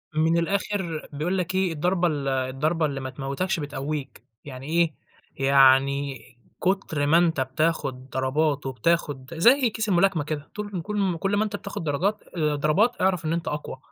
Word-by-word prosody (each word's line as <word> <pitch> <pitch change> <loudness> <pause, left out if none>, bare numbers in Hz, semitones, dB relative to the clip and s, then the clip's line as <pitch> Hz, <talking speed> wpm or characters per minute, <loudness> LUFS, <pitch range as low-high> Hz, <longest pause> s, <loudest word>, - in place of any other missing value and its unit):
من 160 +2 +3
الآخر 185 -2 -2
بيقول 175 +6 -1
لك 185 +1 -2
إيه، 190 -3 +1
الضربة 175 +3 +1
ال 145 -3 -2
الضربة 135 +5 0
اللي 140 -2 -2
ما 130 0 -5
تموتكش 140 +8 -2
بتقويك. 145 -2 -5 0.2
يعني 135 0 -8
إيه؟ 165 -1 +2 0.5
يعني 135 0 +4 0.4
كُتر 180 -6 0
ما 160 +3 +5
أنت 165 -5 +2
بتاخد 130 -2 -1
ضربات 140 +3 0
وبتاخد 135 +1 -1
زي 240 - +5
كيس 220 0 -3
الملاكمة 180 -3 +3
كده 150 -1 -5
طول 205 -4 -4
كل 210 +4 -4
م 185 -4 +1
كل 195 +4 0
ما 215 - +3
أنت 210 -1 -3
بتاخد 200 -4 -6
درجات 185 +8 -1
آآ، 150 -2 +1
ضربات 175 +12 +2
أعرف 185 -3 +1
إن 160 - 0
أنت 170 - -3
أقوى. 150 -2 -4
160 Hz, 170 wpm, -25 LUFS, 140-185 Hz, 0.5 s, ما